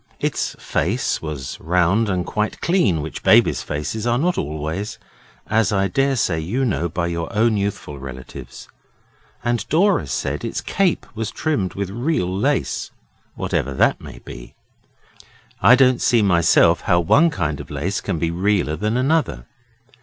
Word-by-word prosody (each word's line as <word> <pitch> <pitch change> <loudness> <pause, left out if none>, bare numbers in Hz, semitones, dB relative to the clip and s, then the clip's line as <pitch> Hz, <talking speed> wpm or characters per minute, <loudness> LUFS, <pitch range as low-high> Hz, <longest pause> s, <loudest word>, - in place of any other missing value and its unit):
Its - - -2
face 110 +8 -1
was 75 -5 -6
round 90 +6 +2
and 90 -2 -1
quite 105 0 -2
clean, 110 - +1
which 80 - -6
babies' - - +4
faces 105 +10 -4
are 120 0 +2
not 175 +6 +1
always, 80 +7 -4 0.5
as 110 -3 +1
I 95 -1 +2
daresay 135 - +1
you 110 +12 -1
know 85 -7 -1
by 85 +1 -2
your 85 -1 -3
own 110 +1 +2
youthful 100 -8 -3
relatives; 65 -1 -9 0.8
and 120 -2 0
Dora 195 +7 +3
said - - -3
its - - -3
cape 195 -3 0
was 110 -1 -3
trimmed 125 - -2
with 100 -1 -3
real 120 - -1
lace, 100 - -1 0.5
whatever 70 +1 -2
that - - +2
may - - -10
be - - -11 1.1
I 125 - +8
don't 130 -2 +4
see 115 -3 +3
myself 85 -4 +4
how 85 - +2
one 145 - +4
kind 80 - -2
of - - -9
lace 95 +3 -2
can 95 -5 -2
be 80 +1 -1
realler 90 -3 0
than 105 +3 0
another. 130 - 0
100 Hz, 155 wpm, -21 LUFS, 85-120 Hz, 1.1 s, I